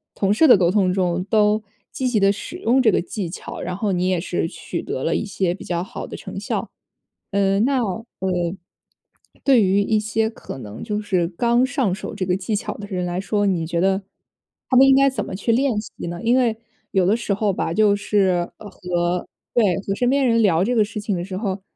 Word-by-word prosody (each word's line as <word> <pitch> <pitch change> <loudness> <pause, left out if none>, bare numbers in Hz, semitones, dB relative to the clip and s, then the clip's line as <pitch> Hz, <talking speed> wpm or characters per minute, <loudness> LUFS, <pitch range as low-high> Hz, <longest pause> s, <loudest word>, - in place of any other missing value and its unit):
同 195 0 +2
事 315 +9 +5
的 245 - +8
沟 175 -2 +3
通 185 -3 +2
中 180 -1 0
都 210 +1 +2 0.3
积 260 - -2
极 235 -4 +2
地 195 0 +4
使 205 - -6
用 250 +4 +2
这 220 -4 +4
个 - - +2
技 180 0 -5
巧， 175 - -7
然 180 +1 -4
后 205 -1 -1
你 180 0 0
也 185 -2 +1
是 175 -1 -2
取 160 -1 -6
得 130 - -4
了 165 - +1
一 - - -1
些 190 -3 -1
比 190 - -9
较 175 -1 -2
好 190 - -7
的 - - -7
成 - - -7
效。 - - -3 0.6
呃， 195 0 +2
那 260 +2 +2
呃， 195 -1 -4 1.1
对 265 -4 +5
于 195 +2 +3
一 215 +1 +1
些 220 +1 0
可 220 - -9
能 105 -3 -9
就 210 -1 -2
是 185 -5 0
刚 235 +7 +2
上 260 -8 0
手 215 - -7
这 190 - -2
个 180 0 +1
技 200 +3 -2
巧 - - -4
的 205 0 -8
人 180 -3 -2
来 175 +1 -2
说， 205 +1 0
你 170 -5 0
觉 170 0 -1
得 195 +1 +1 0.7
他 255 - +4
们 270 +1 +8
应 270 - +6
该 275 0 +5
怎 265 - -3
么 - - -6
去 220 +4 0
练 250 -2 +2
习 - - -11 0.2
呢？ 175 +1 -5
因 240 +3 +3
为 235 -3 +2 0.4
有 190 -3 +2
的 210 +4 +3
时 230 -3 -1
候 205 0 +1
吧， 165 - -2
就 210 +1 +4
是 190 -4 +1
和 180 -3 -3 0.3
对， 205 -7 +3
和 195 - +1
身 245 +2 +1
边 275 0 +2
人 230 -1 +3
聊 180 -4 +3
这 245 +4 0
个 215 -2 +4
事 210 0 -6
情 205 -2 -1
的 175 - -3
时 190 -1 -6
候， 195 -2 -3
200 Hz, 250 characters per minute, -22 LUFS, 180-225 Hz, 1.1 s, 的